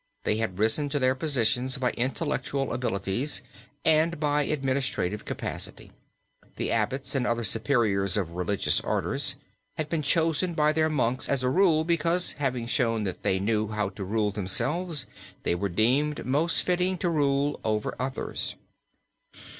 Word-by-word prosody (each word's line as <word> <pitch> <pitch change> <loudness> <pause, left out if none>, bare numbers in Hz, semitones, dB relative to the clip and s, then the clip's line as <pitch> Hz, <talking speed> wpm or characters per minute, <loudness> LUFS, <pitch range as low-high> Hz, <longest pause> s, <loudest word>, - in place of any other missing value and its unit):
They 105 - +1
had 110 -5 -2
risen 110 +8 +3
to 145 - -1
their 130 -2 +3
positions 130 -2 +1
by 130 -2 0
intellectual 135 +1 -1
abilities 120 +4 -1 0.4
and 160 +1 +3
by 150 -1 +2
administrative 130 -8 -1
capacity. - - -5 0.6
The - - -2
abbots 135 +1 0
and 130 -3 0
other 120 0 0
superiors 110 -4 +1
of 90 -5 -1
religious 90 +3 0
orders - - -1 0.4
had 155 -1 -2
been 165 -1 0
chosen 165 +3 +2
by 150 0 +3
their 155 0 +2
monks 130 -4 0
as 135 -2 +1
a 125 - +2
rule 165 0 +4
because, 170 +2 +1
having 125 -4 -1
shown 115 -3 +1
that 95 -3 -4
they 95 - +1
knew 110 +2 0
how 105 -2 -1
to 100 0 -7
rule 105 +2 0
themselves, 135 - 0 0.4
they - - +1
were 100 +3 -1
deemed 130 +10 +1
most 150 +6 +2
fitting 180 +1 +1
to 180 - -1
rule 145 -3 +1
over 110 -1 -1
others. 130 +1 -3
130 Hz, 150 wpm, -27 LUFS, 110-150 Hz, 0.6 s, rule